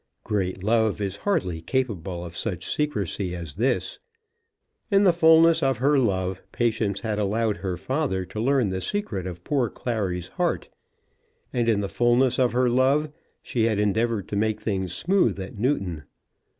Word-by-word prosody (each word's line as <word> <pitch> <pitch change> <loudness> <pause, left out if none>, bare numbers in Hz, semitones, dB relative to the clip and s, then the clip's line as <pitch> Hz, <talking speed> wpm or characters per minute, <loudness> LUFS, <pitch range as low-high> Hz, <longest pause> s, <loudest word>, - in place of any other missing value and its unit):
Great 95 -3 -2
love 110 0 +2
is 100 -1 -3
hardly 115 - -1
capable 95 -6 -2
of 85 0 -9
such 90 -3 -3
secrecy 100 - -2
as 85 -4 -7
this. 120 - -1 0.9
In 200 -1 +4
the 185 -3 +5
fulness 165 0 +6
of 135 -3 +2
her 140 +3 +3
love 95 -5 0
Patience 110 -4 0
had 110 -2 -2
allowed 105 +1 0
her 95 -2 -3
father 130 - -1
to 105 - -7
learn 130 -2 +2
the 95 0 -3
secret 110 - -3
of 85 -1 -8
poor 135 -5 0
Clary's 95 -7 -3
heart; - - -1 0.8
and 120 -1 +1
in 105 -3 +2
the 100 - -2
fulness 120 +4 +2
of 125 -3 +3
her 125 +2 +2
love 135 +5 +2 0.3
she 115 -3 0
had 110 -2 +1
endeavoured 105 0 0
to - - -3
make 110 +1 0
things 95 -4 -2
smooth 160 - +1
at 95 +3 -7
Newton. 95 - -1
110 Hz, 165 wpm, -25 LUFS, 95-130 Hz, 0.9 s, fulness